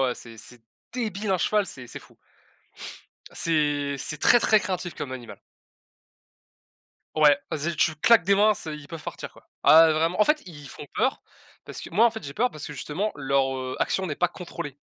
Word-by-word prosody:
ouais, - - +3
ouais. 125 - -2
C'est 115 -1 -11
c'est 120 +2 -8 0.3
débile 215 -4 -3
un 185 - +2
cheval 210 +3 +1
c'est 130 -7 -8
c'est - - -7
fou. - - -19 1.1
c'est 145 -3 0
c'est 150 - -4
très, 240 - +6
très 220 -1 +4
craintif 180 -3 -4
comme 130 - -6
animal. 125 -2 -9 1.8
Ouais, 150 -2 +5
vas-y 155 +2 -2
tu 160 - +2
claques 225 +3 +5
des 200 - +4
mains, 210 +2 +4
c'est 160 -5 -5
ils 150 -1 -11
peuvent 165 -1 -8
partir - - -7
quoi. - - -20 0.2
Ah 165 +1 +8
ouais 160 - +3
vraiment 165 +4 0
en 210 - +6
fait, 300 0 +2
i - - -9
ils - - -11
font - - -9
peur - - 0 0.4
parce - - -8
que - - -9
moi 220 +7 +5
en - - +2
fait 220 0 -8
j'ai 140 - -7
peur 245 - +1
parce 150 - -8
que - - -7
justement 165 +9 -3
leur, 135 -1 +1
heu, 130 0 -4
action 190 -1 0
n'est 150 - -4
pas 180 - +2
contrôlée. 145 -6 -8
160 Hz, 215 wpm, -25 LUFS, 145-200 Hz, 1.8 s, Ah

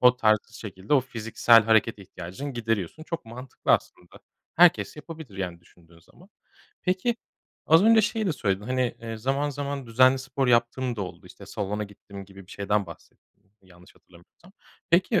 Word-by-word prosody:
o 125 0 +6
tarz 110 -3 +4
şekilde 100 +2 -3
o 140 - +5
fiziksel 115 -2 +3
hareket 110 0 +3
ihtiyacını 95 +8 -8
gideriyorsun. 115 - -2
Çok 165 -1 -5
mantıklı 125 +3 -3
aslında. 90 - -2 0.4
Herkes 175 -1 +4
yapabilir, 155 - -10
yani, 90 -3 -4
düşündüğün 85 -1 -22
zaman. 175 - -21 0.5
Peki, 190 +6 0 0.5
az 160 +3 +6
önce 225 0 +7
şeyi 220 0 -1
de 180 - +1
söyledin, 100 -7 -1
hani, 130 -1 0
eee, 115 -1 -5
"Zaman 135 +6 -1
zaman 140 -2 -4
düzenli 130 +3 +4
spor 135 +1 -2
yaptığım 120 +1 +1
da 105 - -2
oldu, 90 - -9
işte, - - -13
salona 105 +1 -3
gittim." 100 -1 -12
gibi 95 -1 -14
bir - - -17
şeyden 100 -1 -1
bahsettin, 95 +4 -17
yanlış 90 -1 -19
hatırlamıyorsam. 90 - -21 0.4
Peki, 185 +6 +3
115 Hz, 160 wpm, -26 LUFS, 100-140 Hz, 0.5 s, önce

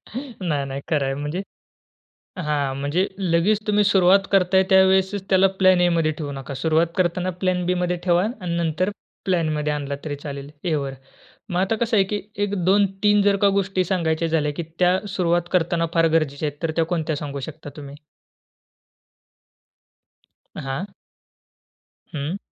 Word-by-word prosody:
नाही, 185 - -3
नाही, 135 0 -5
खरं 145 -4 +1
आहे, 135 - -1
म्हणजे 150 +6 -3 1.0
हां, 145 -4 -1
म्हणजे 145 +8 0
लगेच 185 +3 +2
तुम्ही 210 0 +3
सुरुवात 195 0 +4
करताय, 190 0 +4
त्यावेळेसच 190 +1 +3
त्याला 190 0 +5
प्लॅन-एमध्ये 175 -4 +4
ठेवू 145 -2 -4
नका, 135 0 -7
सुरुवात 160 +4 +2
करताना 180 0 0
प्लॅन-बीमध्ये 180 -1 0
ठेवा 175 +1 +3 0.2
आणि 170 -2 -3
नंतर 170 +3 0 0.3
प्लॅनमध्ये 155 -5 0
आणला 140 -1 -3
तरी 145 -2 -4
चालेल, 140 0 -7
एवर. 140 -5 -1 0.5
मग 180 -1 0
आता 195 +4 +1
कसं 230 0 0
आहे 195 - +5
की 205 - -1 0.2
एक 205 0 -2
2-3 200 +1 +3
जर 200 0 +3
का - - +7
गोष्टी 190 -1 0
सांगायच्या 165 -2 0
झाल्या, 150 -2 0
की 170 - -2 0.2
त्या 180 +1 +4
सुरुवात 175 -2 0
करताना 170 -1 +1
फार 165 0 +4
गरजेच्या 150 -2 +1
आहेत, 145 +3 -11
तर 165 - 0
त्या 165 - +3
कोणत्या 160 -3 -2
सांगू 140 -1 -5
शकता 150 -1 -12
तुम्ही? 140 -1 -9 2.6
हां. 135 +9 -4 1.2
हं. 150 +6 -3
175 Hz, 145 wpm, -22 LUFS, 150-190 Hz, 2.6 s, का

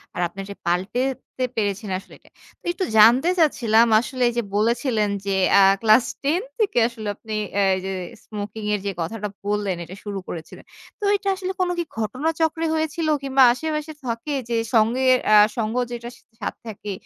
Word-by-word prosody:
আর 175 - -2
আপনি 185 +3 -13
যে 195 - -4
এটা - - -22
পাল্টাতে 245 +9 -2
পেরেছেন 205 -1 -2
আসলে - - -17
এটা। - - -23 0.3
তো - - -25
একটু 370 +1 -2
জানতে 240 +9 +7
চাচ্ছিলাম 235 -7 +4
আসলে 250 +1 -1
যে, 240 - +1
বলেছিলেন 225 0 +1 0.2
যে 195 -1 0 0.2
অ্যা 200 - +7 0.2
ক্লাস 225 +2 +5 0.2
10 310 +6 +1 0.2
থেকে 420 - 0
আসলে 230 -3 -8
আপনি 220 +1 -8 0.3
আ - - +4 0.2
যে 195 - -3 0.3
স্মোকিং 210 0 -6
এর 210 - 0
যে - - 0
কথাটা 210 +5 -3 0.2
বললেন 205 -2 -1
এটা 175 +3 -10
শুরু 205 -2 -4
করেছিলেন। 165 -1 -8 0.3
তো - - -10
এটা 400 0 -4
আসলে 375 0 -4
কোনো 360 -1 +1
কি - - +1
ঘটনাচক্রে 320 +8 -1
হয়েছিল, 315 +1 -1 0.2
কিংবা 270 -1 +4
আশেপাশে 305 +3 -3
থাকে 235 +5 -3 0.2
যে 235 - 0 0.2
সঙ্গে 230 +4 +3 0.3
আ - - +8 0.2
সঙ্গ 220 0 -1 0.2
যেটা 240 0 -6 0.3
সাথে - - -4
থাকে, 210 -1 -6
230 Hz, 170 wpm, -23 LUFS, 210-285 Hz, 0.3 s, আ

